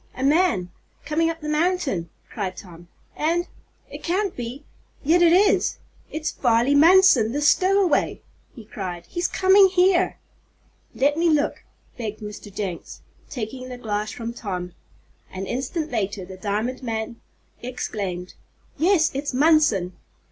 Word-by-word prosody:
"A 260 - -4
man 285 - +2 0.3
coming 320 +3 +1
up 330 0 -5
the 300 - -6
mountain," 300 - 0 0.2
cried 190 -5 -4
Tom. 175 -2 -12 0.3
"And 340 +3 0 0.4
it - - -10
can't 380 +2 -1
be 245 +4 -6 0.4
yet 330 +5 +3
it 340 -1 +6
is 400 +4 +3 0.3
it's 310 0 -3
Farley 240 +2 +2
Munson 305 - +6
the 290 - -1
stowaway!" 370 +4 +2 0.4
he 230 -5 -11
cried. 180 -4 -6
"He's 345 - -2
coming 385 +1 +5
here!" 370 0 +3 0.8
"Let 285 +3 +2
me 335 0 +3
look!" 300 -2 0 0.4
begged 215 -2 -5
Mr. 210 -1 -9
Jenks, 190 -3 -6 0.3
taking 255 +1 -6
the 250 - -7
glass 215 -3 -3
from 235 0 -6
Tom. 180 -6 -5 0.6
An 190 +1 -5
instant 280 - -3
later 205 -4 -2
the 190 +1 -10
diamond 215 +6 -2
man 225 -1 -4 0.4
exclaimed: 200 -7 -5 0.5
"Yes, 330 -1 +3
it's 280 -1 -3
Munson!" 285 - +3
255 Hz, 135 wpm, -23 LUFS, 210-330 Hz, 0.8 s, it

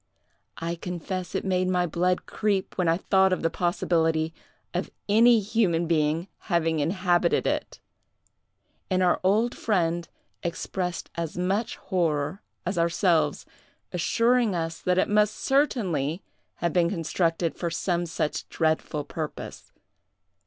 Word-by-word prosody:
I 165 +1 -3
confess 180 +1 -5
it - - -1
made 185 -1 +1
my 180 -1 +2
blood 180 +2 0
creep 205 -3 -1
when 180 -2 0
I 165 +1 +3
thought 190 0 +3
of 185 - 0
the 165 - +1
possibility 165 -3 +1 0.4
of - - -2 0.2
any 230 +3 +6
human 195 -5 +1
being 160 +1 +1 0.2
having 165 -4 +1
inhabited 175 +2 +2
it! - - -2 1.1
And 185 -1 +2
our 180 - +3
old 215 +6 +2
friend 170 -5 0 0.3
expressed 180 +1 -3
as 170 -1 -4
much 195 +5 0
horror 160 -1 -1 0.2
as 180 0 -1
ourselves, 170 0 +2 0.5
assuring 230 +5 +2
us 165 -1 -3
that 180 0 +1
it 185 - +3
must 210 0 +3
certainly 190 - 0 0.3
have 170 -2 -1
been 175 -2 +3
constructed 165 -1 0
for 170 - -2
some 175 +1 -1
such 160 -2 -2
dreadful 155 -2 0
purpose. 155 +1 -7
175 Hz, 130 wpm, -26 LUFS, 165-190 Hz, 1.1 s, any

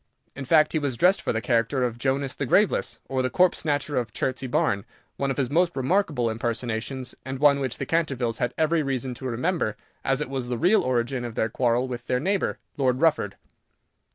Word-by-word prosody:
In 135 - -6
fact, 155 +2 +4
he 160 - +2
was 140 -5 -2
dressed 180 - +4
for - - -1
the 110 - -1
character 120 +3 +1
of 120 -1 -2
"Jonas 135 +1 0
the 140 - -3
Graveless, 205 - +2
or 130 -1 -1
the 130 - 0
Corpse 180 +8 +3
Snatcher 145 -2 -1
of 120 -3 -1
Chertsey 130 0 -2
Barn," 100 -5 +1 0.3
one 140 - -1
of 135 - -2
his 135 -3 0
most 175 +2 +2
remarkable 140 -2 +1
impersonations, 120 +2 -3
and 130 0 -5
one 140 0 +5
which 130 -3 -2
the 140 - -3
Cantervilles 135 -8 0
had 120 - 0
every 160 +1 +2
reason 135 -2 -2
to 130 +2 -6
remember, 125 - -1 0.3
as 135 -1 +1
it - - -2
was 130 -2 -4
the 120 -1 -2
real 185 - +4
origin 125 0 -1
of 120 -2 -6
their 110 - 0
quarrel 120 +2 +1
with 125 -2 -6
their 125 - +1
neighbour, 195 +7 0 0.2
Lord 130 -2 +1
Rufford. 155 -11 +2
130 Hz, 210 wpm, -25 LUFS, 120-145 Hz, 0.3 s, one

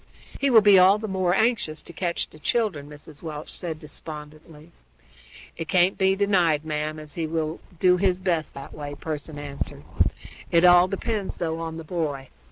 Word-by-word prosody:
"He 280 - +2
will 230 -4 +7
be 200 -2 +8
all 190 +3 +6
the 215 +1 -5
more 185 -2 +1
anxious 220 -9 0
to - - -12
catch 170 0 -2
the 155 - -16
children," 155 -5 -1
Mrs. 150 0 -11
Welch 155 -2 -6
said 165 -3 -5
despondently. 155 +1 -10 0.9
"It 165 - -4
can't 180 +3 +3
be 190 0 +3
denied, 180 -7 +2
ma'am, 155 0 -2
as 155 -2 -10
he 165 0 -2
will 160 0 -2 0.2
do 180 -1 +5
his 185 -1 +2
best 175 -5 -1
that 140 0 -9
way," 145 -1 -6
Pearson 150 0 -6
answered. 145 -1 -5 0.7
"It 170 +1 +4
all 175 0 +7
depends, 200 +1 -3
though, 165 -1 -2
on 165 -1 -5
the 165 - -7
boy. 150 -5 -3
165 Hz, 175 wpm, -25 LUFS, 155-185 Hz, 0.9 s, be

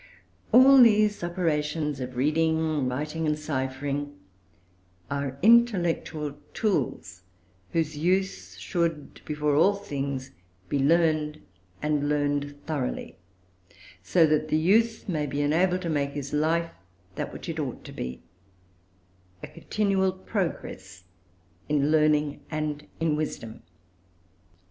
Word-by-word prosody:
All 265 +1 +8
these 215 -4 +4
operations 150 -4 -1
of 125 -1 -5
reading, 155 0 +1
writing, 150 +5 -3
and 150 0 +1
ciphering, 140 -1 -3 0.9
are 140 -1 -3
intellectual 175 -10 +3 0.2
tools, 145 - -1 0.5
whose 155 -2 -1
use 170 - -1
should, 165 - -2
before 150 -1 0
all 195 +8 +4
things, 140 -7 -4 0.4
be 140 - 0
learned, 155 0 +2 0.4
and 150 -1 0
learned 145 -1 -1
thoroughly; 145 - -4 0.8
so 165 - +4
that 155 0 +1
the 155 - +1
youth 220 +8 +2
may 155 -6 -1
be 145 +1 -1
enabled 180 +5 +2
to - - -3
make 140 -2 -1
his 140 -1 -5
life 165 +3 +1 0.4
that - - -4
which - - -9
it - - -4
ought - - -4
to - - -10
be, 65 0 -6 1.2
a - - -5
continual 195 -3 0
progress 165 - -5 0.7
in 145 0 +2
learning 150 -2 +2
and 150 -1 -3
in 160 -2 +1
wisdom. 125 -7 -5
150 Hz, 115 wpm, -26 LUFS, 145-170 Hz, 1.2 s, All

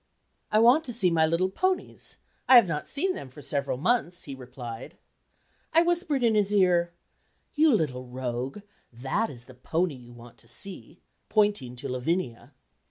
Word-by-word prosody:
"I 215 - +3
want 245 +8 +6
to 245 - -6
see 190 -6 +2
my 160 -1 +3
little 175 +4 +1
ponies; 370 - -2 0.3
I 260 - +9
have 235 -5 +8
not 150 -3 -3
seen 370 +6 0
them 135 - -8
for 145 +3 -13
several 140 -3 -1
months," 180 - 0
he 140 - -6
replied. 125 -2 -9 0.8
I 330 +1 +6
whispered 340 -6 +1
in 230 -2 +4
his 205 -1 +2
ear, 180 -4 +3 0.6
"you 310 0 +4
little 130 - 0
rogue, 125 - -4 0.3
that 130 - -2
is 120 -2 -11
the 130 - -14
pony 160 +7 -1
you 125 -2 -13
want 120 0 -14
to 115 - -21
see," 180 - -6 0.3
pointing 205 - +1
to 125 - -7
Lavinia. 130 -1 -2
165 Hz, 165 wpm, -27 LUFS, -, 0.8 s, I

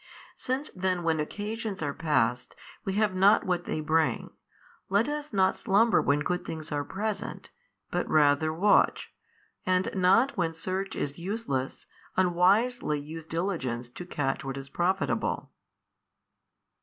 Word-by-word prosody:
Since 265 +4 -3
then 185 -1 0
when 165 -1 +1
occasions 205 +3 -4
are 145 -1 -1
passed, 125 -6 0 0.3
we 195 - -1
have 210 -1 +2
not 195 +3 +5
what 175 -1 -1
they 155 - -2
bring, 155 +1 +1 0.6
let 200 +4 +3
us 295 0 -4
not 190 -3 +3
slumber 225 +2 +3
when 145 +1 +2
good 180 +4 -1
things 155 -1 -6
are 145 -1 -1
present, 210 +7 -4 0.4
but - - -1
rather 155 +1 +4
watch, 190 +6 +2 0.5
and 185 0 +1
not 195 +8 +3
when 165 -4 -1
search 190 +4 -3
is 145 +3 -3
useless, 170 - -3 0.3
unwisely 185 +1 +3
use 155 +2 -8
diligence 135 -10 -2
to 180 - -8
catch 140 -6 -2
what 135 0 -4
is 135 0 -8
profitable. 180 +6 -1
180 Hz, 135 wpm, -28 LUFS, 150-200 Hz, 0.6 s, not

